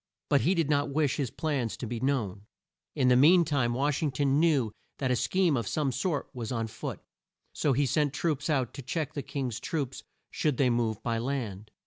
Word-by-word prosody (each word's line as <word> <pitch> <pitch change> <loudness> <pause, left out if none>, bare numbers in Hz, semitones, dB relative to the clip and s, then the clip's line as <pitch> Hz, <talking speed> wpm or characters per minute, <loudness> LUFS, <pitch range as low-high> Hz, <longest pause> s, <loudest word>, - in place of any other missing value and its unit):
But 140 - +4
he 185 +4 +2
did 165 -4 +1
not 145 -1 +1
wish 145 -1 +1
his 135 -5 -1
plans 135 -7 -2
to - - -5
be 120 0 -4
known. 110 -7 -1 0.5
In 130 -4 +3
the 125 - +6
mean 165 +7 +6
time, 130 -6 +1
Wash 140 +2 0
ing 155 - +1
ton 140 +1 +1
knew 145 -9 +3 0.3
that 130 -2 0
a - - +3
scheme 180 +5 +2
of 115 -5 -2
some 145 +2 0
sort 160 +2 -1
was 120 -2 -5
on 115 -2 -1
foot 110 - -6 0.5
so 145 - +1
he 140 +3 +2
sent 145 +1 +1
troops 145 0 -1
out 130 -6 0
to 140 - -7
check 150 +3 -3
the 145 - -3
King's 135 -6 -4
troops 140 -5 -3 0.3
should 150 -5 0
they 130 -3 +3
move 115 -3 0
by 115 -1 0
land. 115 -6 -3
135 Hz, 210 wpm, -29 LUFS, 120-150 Hz, 0.5 s, the